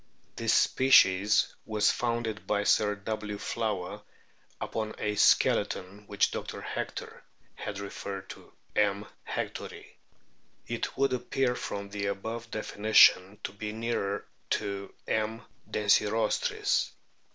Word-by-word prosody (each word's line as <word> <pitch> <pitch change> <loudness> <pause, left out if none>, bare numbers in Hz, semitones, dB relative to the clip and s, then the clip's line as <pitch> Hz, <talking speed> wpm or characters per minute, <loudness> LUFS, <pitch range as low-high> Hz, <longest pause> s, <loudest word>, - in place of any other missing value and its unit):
This - - +2
species 105 -6 +5
was 105 -1 +2
founded 115 -3 -2
by 105 -1 +1
Sir 105 0 +3
W. 105 0 -4
Flower 105 -5 -3 0.6
upon 110 -1 -3
a 105 - -1
skeleton 100 0 +2
which 100 - +2
Dr. - - -5
Hector - - -5 0.3
had 100 - -6
referred 100 -1 -6
to - - -13 0.2
M. 100 0 +2 0.2
hectori. - - -4 0.8
It 120 0 -4
would 135 -1 +2
appear 125 0 0
from 100 -4 -5
the 100 0 -3
above 110 +4 -4
definition 105 -2 +4
to - - -3
be 105 +2 -5
nearer 110 -3 -2 0.2
to 100 -1 -2 0.2
M. 110 +2 -1 0.3
densirostris. 105 +1 +2
105 Hz, 110 wpm, -29 LUFS, 100-110 Hz, 0.8 s, species